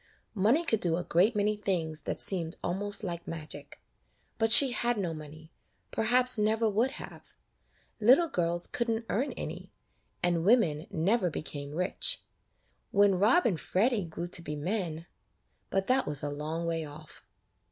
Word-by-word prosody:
Money 230 - +2
could 225 -9 +1
do 170 -3 +1
a 175 - -3
great 190 +9 +2
many 210 +1 +1
things 165 -7 -3
that - - -4
seemed 170 -3 0
almost 200 +4 -1
like 170 -3 -5
magic; 155 -2 -8 0.6
but 225 0 +2
she 265 +2 +10
had 240 -1 0
no 180 -5 -2
money, 155 +1 -11 0.4
perhaps 250 +1 +2
never 220 +2 +1
would 225 +6 0
have. - - -10 0.6
Little 255 +10 +5
girls 175 - -1
could 235 -1 -3
n't 225 0 -2
earn 255 +8 -1
any, - - -7 0.5
and 175 -2 +1
women 175 -8 +2
never 185 +4 +1
became 145 -2 -6
rich. 185 - 0 0.7
When 200 -2 +3
Rob 235 - +4
and 180 -8 +1
Freddy 220 +2 0
grew 170 0 -6
to 175 -1 +1
be 150 -2 -5
men 165 0 -3 0.3
— - - -46
but 195 0 0
that 260 +3 +1
was 145 -1 0
a 145 - -2
long 155 +3 -4
way 165 -1 -2
off. 150 +1 -12
185 Hz, 165 wpm, -29 LUFS, 165-225 Hz, 0.7 s, she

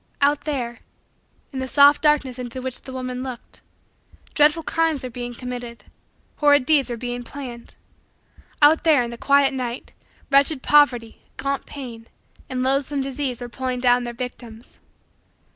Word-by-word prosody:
Out 290 +1 +2
there, 245 -6 -3 0.7
in 265 - -4
the 260 - -3
soft 285 +3 +6
darkness 290 -4 +1
into 250 0 -6
which 255 -1 -4
the 265 - -10
woman 255 -1 -5
looked, 255 -2 -8 0.7
dreadful 300 +2 +3
crimes 320 -4 0
were 255 - -5
being 245 0 -6
committed, 245 -1 -7 0.5
horrid 290 -3 +4
deeds 285 -3 +3
were 240 - -4
being 245 +1 -4
planned. 245 -2 -9 0.9
Out 310 +3 +6
there, 305 -6 +4
in 235 - -5
the - - -6
quiet 280 -1 +3
night, 250 -2 -5 0.4
wretched 280 0 +3
poverty, 250 -6 +3 0.2
gaunt 275 0 -3
pain, 235 -5 -9 0.4
and 255 -1 -2
loathsome 275 +1 0
disease 265 -2 -4
were 245 - -5
pulling 255 +1 -4
down 245 0 +3
their 240 - -4
victims. 240 -2 -8
260 Hz, 150 wpm, -22 LUFS, 245-285 Hz, 0.9 s, soft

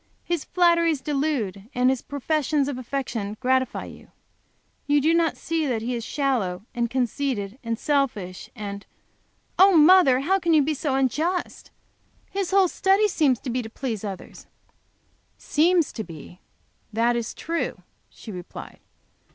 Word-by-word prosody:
His 340 -3 -2
flatteries 335 -3 +3
delude, 265 -9 -2
and 250 +1 +4
his 265 - -2
professions 290 0 -1
of 275 -3 -3
affection 235 -5 -4
gratify 260 0 0
you. - - -12 0.8
You 290 0 +4
do 315 +4 +3
not 335 -2 +2
see 325 -2 -1
that 230 -4 -1
he 245 +2 -2
is 235 -1 -3
shallow, 225 -11 -1
and 235 -1 -1
conceited, 250 -3 -2
and 230 -1 -2
selfish 240 -12 -1
and 200 -2 -6 0.4
" - - -37
"Oh 380 -2 +7
mother! 305 -5 +6
How 380 +7 +2
can 335 -3 +2
you 300 - +5
be 310 +3 0
so 285 -1 -1
unjust? 310 +7 -1 0.6
His 390 -2 -2
whole 385 -1 +4
study 390 +4 +3
seems 290 - +2
to 255 - -4
be 250 +1 -1
to 220 - -8
please 225 -3 -4
others." 195 -3 -8 0.9
"Seems 335 +1 +2
to 220 - -4
be 170 +1 -11 0.5
that 230 +2 +2
is 235 -1 -3
true," 335 +1 -3 0.3
she 220 - -11
replied. 180 -2 -9
270 Hz, 150 wpm, -24 LUFS, 230-320 Hz, 0.9 s, Oh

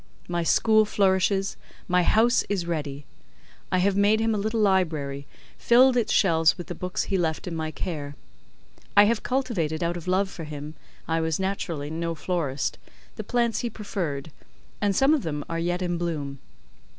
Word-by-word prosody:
My 175 0 -1
school 215 +6 +4
flourishes, 195 -1 +1 0.3
my 180 0 +3
house 225 +7 +3
is 195 -4 -1
ready: 145 -4 -4 0.7
I 185 - +3
have 190 +2 +2
made 205 +2 +4
him 225 0 +1
a - - 0
little 220 +2 -1
library, 155 -9 0 0.3
filled 250 +2 +5
its 240 -3 +1
shelves 165 -4 +4
with 175 - -6
the - - -6
books 180 +2 -3
he 195 - -1
left 160 -2 -1
in 175 -3 -4
my 160 -1 -2
care: 145 -2 -5 0.8
I 205 - +10
have 220 +1 +2
cultivated 195 - -1
out 170 +1 -1
of 175 - -9
love 190 +2 +2
for 165 - -7
him 150 0 -7 0.3
(I 165 0 0
was 160 0 -1
naturally 170 -6 -3
no 165 +1 -2
florist) 155 -5 -2 0.4
the - - -5
plants 235 -2 0
he 240 - -2
preferred, 165 -10 -4 0.5
and 200 -2 +1
some 270 +7 +4
of 305 - +2
them 150 -5 -4
are 165 0 -3
yet 175 +2 -1
in 175 -1 -1
bloom. 145 -5 -3
175 Hz, 175 wpm, -25 LUFS, 160-205 Hz, 0.8 s, I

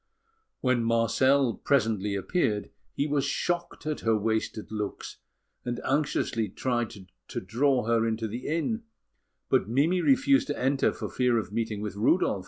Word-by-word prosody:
When 125 -2 +2
Marcel 115 +3 +3
presently 105 -7 +1
appeared, 105 - -1 0.2
he 140 - 0
was 145 -2 +1
shocked 170 +4 -2
at 155 -1 -2
her 110 -1 +2
wasted 110 0 -2
looks, 105 -2 -5 0.5
and 120 -1 -3
anxiously 130 -6 0
tried 120 +2 -1 0.4
to - - -4
draw 125 +4 +1
her 115 0 +2
into 110 0 -1
the 120 +4 -6
inn; 170 +9 -1 0.7
but 100 - +2
Mimi 155 +9 +2
refused 275 +2 +4
to - - -2
enter 135 +2 +2
for - - -5
fear 125 -2 +1
of 110 -2 -3
meeting 110 -2 -2
with 105 -2 -4
Rudolf. 115 - +2
120 Hz, 150 wpm, -28 LUFS, 110-140 Hz, 0.7 s, refused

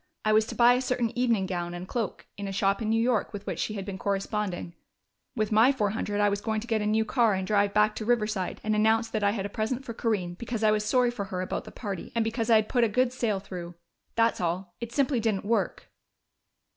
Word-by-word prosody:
I 215 - +4
was 215 0 +4
to - - -6
buy 240 0 +6
a 250 - +1
certain 250 -3 -1
evening 235 -5 +2
gown 175 -2 -3
and 175 +1 -7
cloak 230 -2 -3
in 200 0 -5
a - - -3
shop 195 +2 +1
in 220 - -1
New 225 +1 +2
York 230 -2 +1
with 205 0 -7
which - - -4
she 215 - -2
had 195 -2 -4
been 195 -2 -6
corresponding. 200 -3 -2 0.6
With 215 -3 -1
my 225 +5 +6
four 210 -7 0
hundred 205 -1 -2
I 205 - +4
was 200 0 0
going 220 0 -1
to 215 - -7
get 225 -3 0
a 210 - -1
new 220 +1 +2
car 225 -2 +2
and 190 0 -2
drive 205 0 +2
back 210 +1 +3
to 215 - -4
Riverside 215 -5 0
and 215 0 +1
announce 220 +2 +3
that 215 -2 -1
I 200 - +4
had 200 -2 -2
a - - -3
present 240 +5 -2
for 230 - -5
Corinne, 205 -7 -1
because 230 +3 -4
I 215 - +5
was 210 0 +1
sorry 245 +3 +2
for 215 -5 -4
her 185 -1 -4
about 185 - -3
the - - -10
party, 200 -6 -6
and 230 - +2
because 225 +1 -2
I 230 - +7
had 215 -1 +3
put 245 -2 +2
a 230 - +3
good 250 +3 +1
sale 220 -6 0
through. 175 -3 -8 0.4
That's 230 -3 +2
all.... 175 +1 -2
It 235 0 -5
simply 270 0 +1
didn't 215 -3 -1
work." 230 +2 -1
215 Hz, 260 wpm, -27 LUFS, 200-230 Hz, 0.6 s, I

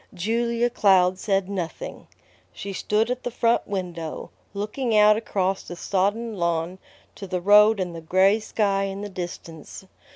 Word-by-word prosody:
Julia 235 +5 0
Cloud 190 -5 +3
said 195 -2 0
nothing. 195 - -6 0.4
She 200 0 -7
stood 215 +5 0
at 250 0 -3
the 245 - -3
front 235 0 +1
window, 175 -5 -5 0.2
looking 215 +3 -1
out 210 0 +6
across 195 -3 -1
the 175 - -9
sodden 205 +6 -1
lawn 170 +1 -1 0.3
to 195 - -9
the 180 0 -2
road 210 +3 +5
and 180 -2 -3
the 165 - -7
gray 190 +6 +3
sky 200 -2 0
in 195 0 -5
the 205 - -5
distance. 175 -2 -8
195 Hz, 155 wpm, -24 LUFS, 185-215 Hz, 0.4 s, out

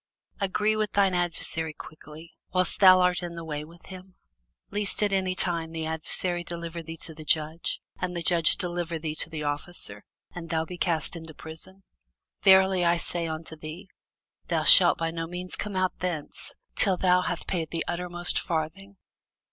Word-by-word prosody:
Agree 210 +2 +1
with 215 -1 -1
thine 195 -2 +3
adversary 165 -2 -1
quickly, 155 +1 -12 0.2
whiles 185 0 +3
thou 185 -2 +8
art 180 0 +2
in 175 -1 -6
the 165 -1 -7
way 150 -1 -4
with 165 +3 -15
him; 185 0 -11 0.6
lest 205 0 0
at 205 -1 +1
any 185 -1 0
time 170 -3 +1
the 160 -1 -4
adversary 175 +2 -1
deliver 170 -1 -5
thee 165 0 -8
to 160 - -4
the 155 0 -10
judge, 155 +2 0 0.2
and 180 -1 -3
the 170 - -3
judge 170 -1 +4
deliver 175 -1 -3
thee 155 -1 -4
to 155 - -2
the 155 -2 -5
officer, 145 -8 -4 0.3
and 170 -1 -8
thou 160 -1 0
be 180 - -8
cast 165 -1 0
into 160 -2 -9
prison. 185 +5 -10 0.6
Verily 190 -1 +5
I 170 0 +3
say 170 0 -3
unto 160 0 -6
thee, 155 +3 -9 0.6
Thou - - 0
shalt - - +8
by 165 0 -1
no 165 0 -4
means 180 +1 -3
come 210 -2 -5
out 185 0 0
thence, 165 -4 -4 0.2
till 190 -3 +2
thou 180 0 +3
hast 175 -2 -3
paid 165 -4 -2
the 165 - -3
uttermost 175 0 +1
farthing. 175 +4 -4
170 Hz, 180 wpm, -27 LUFS, 160-185 Hz, 0.6 s, thou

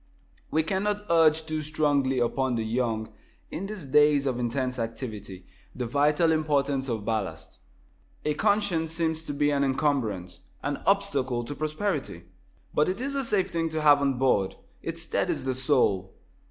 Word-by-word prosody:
We 160 - +2
cannot 205 +4 -1
urge 160 -1 +4
too 155 -1 -2
strongly 145 -3 +1
upon 125 +1 +1
the 115 - -1
young, 110 -1 -1 0.4
in 195 - -4
these 205 -7 -7
days 145 0 +4
of 130 -3 -1
intense 125 +1 -1
activity, 110 -5 -6 0.3
the 125 - -3
vital 150 +6 +3
importance 145 -4 +1
of 110 -3 -3
ballast. 100 -8 -3 0.7
A 150 - +2
conscience 180 -3 +1
seems 160 -1 -1
to 160 - -6
be 145 +1 +2
an 140 -1 +2
encumbrance 120 - -1 0.2
an 145 0 -1
obstacle 140 -12 +1
to 145 - -5
prosperity. 155 - -3 0.5
But 150 - +3
it 185 - -2
is 275 +2 -2
a 275 -1 0
safe 210 -6 0
thing 165 -1 0
to 155 0 -2
have 145 -1 +6
on 135 -2 +1
board. 115 -7 +2 0.3
It - - -4
steadies - - -1
the 130 0 0
soul. 125 -8 +1
145 Hz, 160 wpm, -27 LUFS, 125-160 Hz, 0.7 s, have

